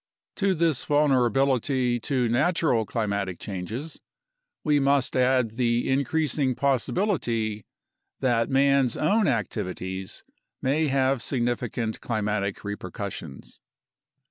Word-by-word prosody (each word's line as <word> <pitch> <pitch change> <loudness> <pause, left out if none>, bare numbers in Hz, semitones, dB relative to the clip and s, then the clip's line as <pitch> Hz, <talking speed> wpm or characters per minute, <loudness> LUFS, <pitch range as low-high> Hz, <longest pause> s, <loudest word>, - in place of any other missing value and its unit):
To 195 -2 +2
this 160 -5 +1
vul 150 0 +2
nerability 130 -1 +2
to 125 -1 0
natural 130 - +1
climatic 100 -5 -2
changes 110 - -6 0.6
we 150 -2 +3
must 140 -1 +2
add 125 -2 +3
the 120 -1 +1
increasing 140 -1 +1
possibility 120 - 0 0.5
that 120 -3 +1
man's 135 -2 +3
own 205 +7 +2
activities 95 -5 -3 0.4
may 150 +4 +1
have 135 -2 +1
significant 120 -3 -2
climatic 105 -3 -2
reper 105 -2 -5
cussions. 85 -9 -7
125 Hz, 100 wpm, -26 LUFS, 110-140 Hz, 0.6 s, we